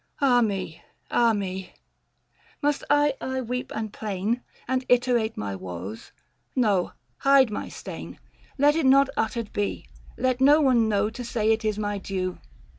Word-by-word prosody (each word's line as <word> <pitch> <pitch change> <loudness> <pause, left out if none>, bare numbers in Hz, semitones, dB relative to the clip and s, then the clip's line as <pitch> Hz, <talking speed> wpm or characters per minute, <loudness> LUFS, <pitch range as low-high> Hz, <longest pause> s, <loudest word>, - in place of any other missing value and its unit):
Ah 255 -4 +4
me, 195 -7 -2 0.3
ah 235 -1 +4
me! 190 -3 -4 0.9
Must 290 -1 0
I 290 0 +4
aye 260 0 -2
weep 250 +1 -4
and 220 -1 -4
plain, 215 +3 -2 0.3
And 260 +1 0
iterate 245 -2 +2
my 100 -2 -3
woes? 95 +3 -7 0.4
No; 205 -8 +2 0.2
hide 275 -4 +5
my - - -4
stain - - -8
— - - -29
530 280 - -2
Let 295 +1 +6
it 325 - +1
not 275 +1 +6
uttered 225 -2 -2
be: 205 0 -2 0.3
let 255 0 0
no 290 +3 +7
one 245 -6 +3
know, 210 +1 +1
To 245 +2 -7
say 225 -2 0
it 225 0 +1
is 215 -1 0
my 205 -1 -2
due. 185 -2 -3
225 Hz, 165 wpm, -25 LUFS, 200-260 Hz, 0.9 s, no